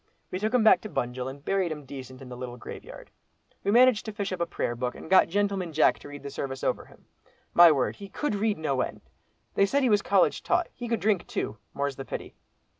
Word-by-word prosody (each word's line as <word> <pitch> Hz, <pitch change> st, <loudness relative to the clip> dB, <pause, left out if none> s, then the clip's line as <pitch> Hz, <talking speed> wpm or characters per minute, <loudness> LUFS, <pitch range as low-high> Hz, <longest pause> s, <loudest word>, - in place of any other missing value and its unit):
We 185 Hz, -, -2 dB
took 215 Hz, +2 st, 0 dB
him 250 Hz, -3 st, +3 dB
back 220 Hz, -, +6 dB
to 215 Hz, -, -7 dB
Bunjil, 125 Hz, -5 st, -3 dB
and 140 Hz, +2 st, -11 dB
buried 190 Hz, -3 st, +1 dB
him 150 Hz, -2 st, -6 dB
decent 130 Hz, -1 st, -9 dB
in 130 Hz, -, -11 dB
the 125 Hz, -, -7 dB
little 125 Hz, 0 st, -7 dB
graveyard. -, -, -10 dB, 0.5 s
We 200 Hz, -, 0 dB
managed 240 Hz, 0 st, +5 dB
to 220 Hz, -, -4 dB
fish 205 Hz, -2 st, -4 dB
up 185 Hz, -, -3 dB
a 170 Hz, -, +1 dB
prayer 120 Hz, -, -2 dB
book, 125 Hz, 0 st, -3 dB
and -, -, -10 dB
got 190 Hz, -, +7 dB
'Gentleman 195 Hz, -2 st, 0 dB
Jack' 155 Hz, -, +4 dB
to -, -, -11 dB
read 145 Hz, 0 st, -9 dB
the 140 Hz, -, -6 dB
service 135 Hz, -1 st, -5 dB
over -, -, 0 dB
him. -, -, -20 dB, 0.5 s
My 170 Hz, -1 st, +9 dB
word! 135 Hz, -4 st, 0 dB
he 200 Hz, -1 st, -9 dB
could 295 Hz, +4 st, -2 dB
read 210 Hz, +1 st, 0 dB
no 140 Hz, -5 st, 0 dB
end. -, -, -4 dB, 0.5 s
They 200 Hz, -, +3 dB
said 280 Hz, +6 st, +1 dB
he 250 Hz, -, +3 dB
was 205 Hz, -1 st, +4 dB
college 195 Hz, -2 st, +2 dB
taught. 355 Hz, -1 st, +1 dB
He 240 Hz, -, -6 dB
could 230 Hz, -5 st, -1 dB
drink 200 Hz, -2 st, +1 dB
too, 110 Hz, -, -3 dB, 0.2 s
more's 140 Hz, -1 st, -2 dB
the 135 Hz, -, -6 dB
pity." -, -, -6 dB
175 Hz, 245 wpm, -27 LUFS, 135-205 Hz, 0.5 s, My